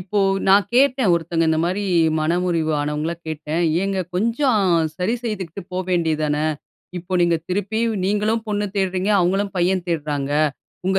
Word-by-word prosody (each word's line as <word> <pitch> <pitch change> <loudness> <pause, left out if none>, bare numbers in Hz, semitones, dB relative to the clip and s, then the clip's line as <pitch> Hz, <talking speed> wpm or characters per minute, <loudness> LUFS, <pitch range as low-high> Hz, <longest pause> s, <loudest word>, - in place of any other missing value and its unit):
இப்போ 195 +3 -2 0.3
நான் 195 0 +5
கேட்டேன், 255 -4 +3
ஒருத்தங்க 165 0 0
இந்த 160 0 +2
மாரி 185 +4 -1 0.4
மனமுறிவு 165 0 0
ஆனவங்கள 150 +3 -2 0.2
கேட்டேன். 155 +2 -2 0.2
ஏங்க 195 -1 -1
கொஞ்சம் 230 +4 +1 0.4
சரி 185 +6 0
செய்துகுட்டு 190 -7 -4
போவேண்டியது 175 -4 0
தானே. 150 0 0 0.5
இப்போ 180 +2 -10
நீங்க, 170 -1 +3
திருப்பியும் 215 +4 -1
நீங்களும் 210 +3 0
பொண்ணு 205 0 -1
தேட்றீங்க 190 0 0
அவங்களும் 195 +3 +1
பையன் 180 +1 +1
தேட்றாங்க. 145 -4 -2 0.6
உங்க 190 0 +2
185 Hz, 135 wpm, -21 LUFS, 165-205 Hz, 0.6 s, நான்